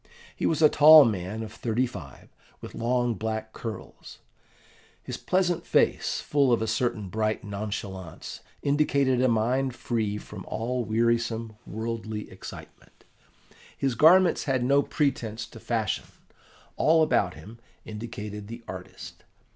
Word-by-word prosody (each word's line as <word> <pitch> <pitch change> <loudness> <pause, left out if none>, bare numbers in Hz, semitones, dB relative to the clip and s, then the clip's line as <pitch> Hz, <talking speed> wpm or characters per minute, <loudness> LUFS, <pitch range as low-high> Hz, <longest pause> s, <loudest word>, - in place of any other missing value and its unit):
He - - 0
was 160 0 +1
a - - +10
tall 150 0 +9
man 105 0 -2
of 110 0 -8
thirty 120 +2 0
five, 85 - -10 0.3
with - - -10
long 120 0 0
black 110 0 -4
curls. 115 -2 -8 0.9
His - - -5
pleasant 180 -2 0
face, - - +1
full 140 -3 +2
of 120 - +3
a 110 - -1
certain 110 -2 -1
bright 110 +2 -1
nonchalance, 100 -4 -6 0.2
indicated 140 -3 +2
a 130 - +4
mind 125 +3 +1
free 110 -4 -2
from 105 -2 -9
all 120 +3 -2
wearisome, 115 0 0
worldly 110 -1 -5
excitement; - - -12 0.7
his 135 -2 0
garments 170 +8 +5
had 130 -3 +1
no 140 +3 +4
pretence 120 -8 -1
to 115 - -13
fashion: 110 -3 -1 0.7
all 160 +1 +4
about 100 - +1
him 105 +9 -12 0.3
indicated 105 -2 -7
the 115 +2 -9
artist. 90 0 -9
115 Hz, 130 wpm, -27 LUFS, 110-130 Hz, 0.9 s, a